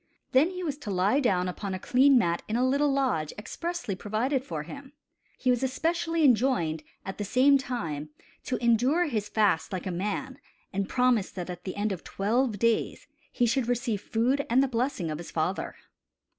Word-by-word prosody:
Then 280 +6 +5
he 365 0 -6
was 295 -4 -3
to 230 - -7
lie 195 +7 +2
down 185 -9 +1
upon 190 +1 -4
a - - -5
clean 265 +6 +5
mat 170 -7 +1
in 215 - -2
a 250 +2 +2
little 280 +2 +2
lodge 255 - 0
expressly 335 - -4
provided 225 +8 -1
for 160 - -5
him. 280 - -10 0.4
He 255 - +2
was 245 - +1
especially 330 +4 0
enjoined, 225 - +2 0.2
at 195 +2 -6
the - - -1
same 265 +7 +4
time, 165 - -4 0.4
to 250 - -1
endure 245 +9 +3
his 215 -9 -2
fast 200 -7 +2
like 185 -3 -4
a 185 - -2
man, 210 +9 -3 0.3
and 195 0 -2
promised 250 -5 +2
that 180 -1 -4
at 180 0 -9
the 185 - -4
end 205 +1 -1
of 185 - -5
twelve 225 +3 0
days 230 +1 0 0.3
he 245 - +1
should 240 +1 +1
receive 240 -4 -1
food 250 +7 +1
and 255 +4 +4
the - - +1
blessing 235 - -1
of 155 - -4
his 170 - -8
father. 170 +4 -2
235 Hz, 190 wpm, -28 LUFS, 195-265 Hz, 0.4 s, Then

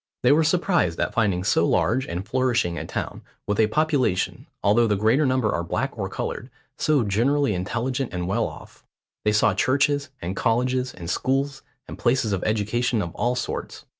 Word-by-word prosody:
They 125 - +5
were 155 +3 +5
surprised 170 - +1
at - - -1
finding 100 -6 +1
so - - +2
large 130 +3 +1
and 90 +4 -5
flourishing 120 -7 +1
a - - -5
town, - - -4 0.2
with 105 -1 -1
a 110 - +5
population, 145 - 0 0.2
although 115 +3 +4
the 105 - +2
greater 110 +9 +3
number 130 -4 +1
are 85 - -1
black 85 - -2
or - - -3
coloured, - - -4 0.3
so 150 -5 +2
generally 120 +5 +1
intelligent 120 +8 -2
and 90 -1 -3
well 115 +4 0
off. - - -12 0.4
They 105 - +4
saw 105 0 +3
churches, 140 +6 +1
and 90 +3 -4
colleges, 125 +3 0
and 85 -2 -9
schools, 135 +8 -1 0.3
and - - -9
places 120 -3 +1
of 95 - -2
education 110 +3 0
of 85 - -6
all 120 +1 0
sorts. - - -5
120 Hz, 180 wpm, -24 LUFS, 100-130 Hz, 0.4 s, They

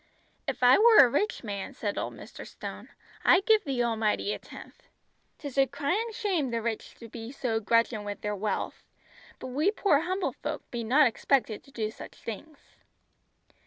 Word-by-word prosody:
"If - - -3
I 250 +6 +7
were 450 0 +7
a - - +3
rich 290 - -1
man," 205 +4 -5
said 205 -4 -3
old - - -4
Mr. - - -10
Stone, - - -8 0.3
"I'd 385 - +5
give 435 -2 +5
the 265 -6 0
Almighty 220 -3 0
a - - -6
tenth. - - -13 0.5
'Tis 280 -2 -4
a 270 - +5
cryin' 385 - -1
shame 380 - -1
the 230 -1 -1
rich 225 -1 -4 0.2
be 230 0 -7
so 240 -5 -1
grudgin' 230 0 +1
wi' 205 0 -4
their 210 +1 -4
wealth; 205 0 -3 0.6
but 260 - -7
we 295 +9 +2
poor 400 -8 +3
humble 370 +4 -2
folk - - -5
be 240 -1 -3
not 270 +7 +5
expected 240 -2 +1
to 275 - -18
do 220 -4 -3
such - - -11
things!" 280 +7 -10
250 Hz, 175 wpm, -28 LUFS, 225-310 Hz, 0.6 s, I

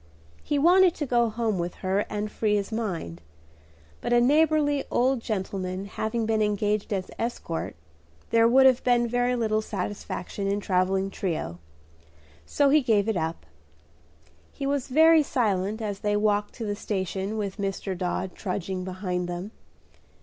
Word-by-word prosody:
He 290 - -1
wanted 355 +4 +5
to 295 - -3
go 240 -3 +2
home 220 -3 -1
with 175 0 -3
her 195 +2 +1
and 210 0 -3
free 210 -2 +1
his 200 0 -2
mind; 175 - -4 0.8
but - - -3
a 240 - +5
neighborly 290 +2 +3
old 260 +1 +2
gentleman 190 -3 -3
having 220 +3 -2
been 220 0 +1
engaged 210 0 0
as 190 -2 -2
escort, 225 -8 -3 0.6
there 230 0 +5
would 265 +3 +6
have 260 -1 +5
been 240 -1 +3
very 245 +1 +1
little 220 -2 +1
satisfaction 200 -1 -4
in 200 +1 +1
a - - -2
travelling 190 0 0
trio; 155 - -3 0.9
so 285 -1 +3
he 300 +2 +5
gave 220 -5 +2
it 220 - +1
up. 160 - -3 1.1
He 275 - -6
was 280 -1 -1
very 320 +4 +6
silent 215 -5 0
as 205 -2 -3
they 205 -1 0
walked 205 0 0
to 230 - -5
the 205 -1 -2
station 195 0 -3
with 200 -2 -3
Dr. 195 -1 -3
Dodd 180 0 -3
trudging 185 -1 -4
behind 180 -1 -3
them. 175 +4 -5
210 Hz, 155 wpm, -26 LUFS, 190-240 Hz, 1.1 s, would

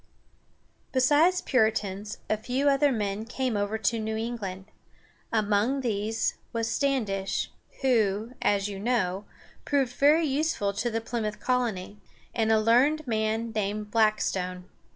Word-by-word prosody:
Besides 295 +8 +4
Puritans, 210 - 0
a 215 - +2
few 255 +6 -1
other 280 0 +4
men 205 -3 -2
came 245 +1 -2
over 205 +1 -1
to 220 +2 0
New 220 0 -2
England. 210 -5 -4 0.7
Among 215 +5 +1
these 220 -2 -1
was 230 -1 -1
Standish, 220 -9 -1 0.3
who, 220 -2 +1
as 200 -1 +2
you 200 -2 -6
know, 205 -4 0 0.4
proved 270 -4 0
very 300 +5 +4
useful 275 -8 0
to 230 +4 -1
the 225 0 -2
Plymouth 220 -2 -3
colony, 225 -6 -1 0.3
and 225 -1 +1
a 220 - +5
learned 260 +8 +3
man 220 -1 -1
named 210 0 -2
Black´stone. 195 -5 +1
220 Hz, 130 wpm, -27 LUFS, 205-255 Hz, 0.7 s, a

